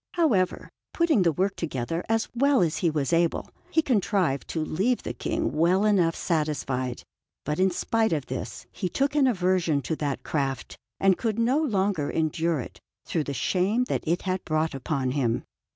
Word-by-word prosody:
However, 215 - +1 0.3
putting 335 - +3
the 170 -2 +4
work 190 +5 0
together 165 +1 -3
as 225 0 +1
well 275 +2 +3
as 165 -3 +1
he 170 - +2
was 150 0 -1
able, 170 0 +1 0.2
he 320 - +2
contrived 195 - +1
to 160 -2 -2
leave 205 +11 0
the - - -4
King 330 -1 -2
well 180 +6 +3
enough 180 -6 +3
satisfied; 140 -7 -1 0.4
but 150 +3 -2
in 190 +1 +4
spite 225 +5 0
of 150 -5 -1
this 130 -1 -6
he 185 - -3
took 275 +10 0
an 290 -3 +4
aversion 180 - +2
to 160 - -2
that 145 -2 -2
craft 135 -4 -2 0.2
and 195 -2 +3
could 225 -3 -1
no 245 +5 +2
longer 195 - 0
endure 160 0 0
it, - - -10 0.3
through 155 -3 -1
the 140 - -3
shame 190 - +1
that - - -1
it 170 +3 0
had 185 -1 -2
brought 155 -1 0
upon 135 -1 -2
him. 125 -4 0
175 Hz, 180 wpm, -26 LUFS, 150-215 Hz, 0.4 s, the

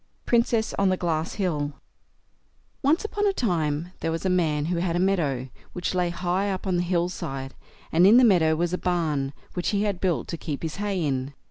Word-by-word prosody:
PRINCESS 230 -2 +2
ON 195 -1 +4
THE 185 - +1
GLASS 165 -2 -1
HILL 150 -7 -1 1.1
Once 310 +9 +2
on 415 0 +2
a 395 - +2
time 170 - -1
there - - -2
was 165 +3 -3
a 190 - +2
man 155 -5 +1
who 175 +2 -1
had 170 0 0
a - - +1
meadow, 150 -9 0 0.2
which 180 - -2
lay 180 -1 +1
high 180 +3 -1
up 190 0 -3
on 185 -2 +1
the - - +2
hill 175 -1 +1
side, 135 -6 -5 0.4
and 175 +3 +6
in 220 +4 +8
the 255 - +7
meadow 170 -8 +5
was 175 +2 -1
a 180 - -1
barn, 155 -6 0 0.2
which 180 - -1
he 205 -1 +1
had 200 -4 -1
built 180 -3 0
to 170 - -3
keep 150 -2 -5
his 160 +1 -4
hay 200 -4 -1
in. 135 0 -2
175 Hz, 215 wpm, -25 LUFS, 160-190 Hz, 1.1 s, in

